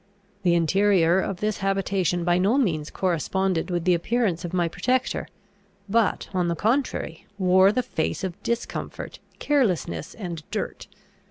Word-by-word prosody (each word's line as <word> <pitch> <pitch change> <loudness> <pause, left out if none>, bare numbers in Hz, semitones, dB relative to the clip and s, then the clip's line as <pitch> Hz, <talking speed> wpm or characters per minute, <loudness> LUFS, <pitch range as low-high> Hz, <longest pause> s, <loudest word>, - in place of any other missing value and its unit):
The 175 -3 +3
interior 180 0 +3
of 190 -1 -3
this 215 -1 -1
habitation 195 -3 0
by 175 +1 +2
no 205 +8 +3
means 165 - 0
corresponded 185 +1 0
with 175 -2 -1
the 180 - +5
appearance 190 0 0
of 175 - -4
my 175 -2 +1
protector, 255 +9 -1 0.6
but, 220 +1 +1
on 180 -2 +1
the 170 - 0
contrary, 225 - -1
wore 190 0 +5
the 250 +3 0
face 170 -8 -2
of 185 -2 -4
discomfort, 235 0 -4 0.2
carelessness, 180 - 0
and 175 -6 -5
dirt. - - -4
185 Hz, 145 wpm, -25 LUFS, 170-205 Hz, 0.6 s, the